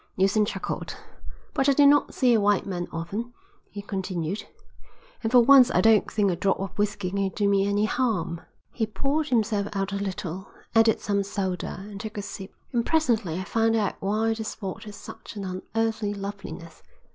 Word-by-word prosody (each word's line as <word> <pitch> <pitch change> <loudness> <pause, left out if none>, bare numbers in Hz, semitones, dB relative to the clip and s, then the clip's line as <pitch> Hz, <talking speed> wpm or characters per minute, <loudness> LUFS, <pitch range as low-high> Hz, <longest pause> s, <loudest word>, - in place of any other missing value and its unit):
Neilson 195 +3 +3
chuckled. 195 - -4 0.6
"But 270 +1 +2
I - - +5
do 285 +1 +5
not 290 +1 +4
see 250 -3 +4
a 220 - +3
white 205 -1 +2
man 180 -3 -3
often," 200 +9 -4 0.4
he 205 -1 -8
continued, 190 -2 -3 0.7
"and 225 - -1
for 250 -1 +7
once 260 0 +7
I - - +2
don't 225 -2 +4
think 205 -3 +1
a - - 0
drop 195 +2 0
of 195 -1 -5
whisky 205 -3 -1
can 195 0 0
do 200 +1 0
me 200 0 +3
any 205 +1 +2
harm." 210 -9 -1 0.3
He 220 -3 -1
poured 285 +7 -1
himself 210 -4 +1
out 195 0 -2
a 200 - -2
little, 190 -2 -4 0.3
added 225 -1 +4
some 200 -1 0
soda, 190 -2 -3
and 200 -2 -8
took 215 -1 -7
a 205 - -3
sip. 195 -1 -8 0.2
"And 235 -1 +2
presently 230 - +1
I - - -3
found 225 +3 +1
out 210 -4 +1
why 215 +3 +1
the 220 0 -5
spot 200 -3 -6
had 210 -1 -9
such - - -10
an 200 -2 -5
unearthly 210 +3 -2
loveliness. 195 -4 -7
205 Hz, 190 wpm, -26 LUFS, 195-225 Hz, 0.7 s, for